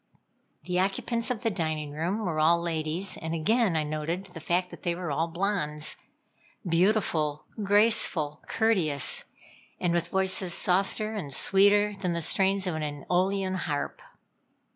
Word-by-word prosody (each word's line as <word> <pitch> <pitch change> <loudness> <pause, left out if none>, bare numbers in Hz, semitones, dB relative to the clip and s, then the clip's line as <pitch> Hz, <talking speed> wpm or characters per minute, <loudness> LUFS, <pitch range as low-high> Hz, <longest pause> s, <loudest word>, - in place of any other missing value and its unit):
The 180 +2 -1
occupants 230 +5 -1
of 240 -4 -3
the 225 - +1
dining 155 -5 -2
room 180 +8 -2
were 160 -3 -1
all 165 +2 +4
ladies, 165 +2 -2
and 160 +1 -4
again 210 +3 +2
I 155 - +2
noted 155 +5 -3
the 165 - -7
fact 180 +3 0
that - - -11
they 170 -1 -1
were 175 -3 -4
all 160 +4 0
blondes: 165 -4 0 0.7
beautiful, 165 -4 +1 0.2
graceful, 200 -7 +2
courteous, 180 - +2 0.5
and 175 -1 +1
with 170 -1 0
voices 190 -1 0
softer 195 +4 0
and 185 -10 -5
sweeter 205 +7 +4
than 180 -3 0
the 170 - -2
strains 195 +4 +2
of 180 - -1
an 155 - -3 0.3
eolian 190 +1 +1
harp. 155 - -3
180 Hz, 145 wpm, -28 LUFS, 160-200 Hz, 0.7 s, all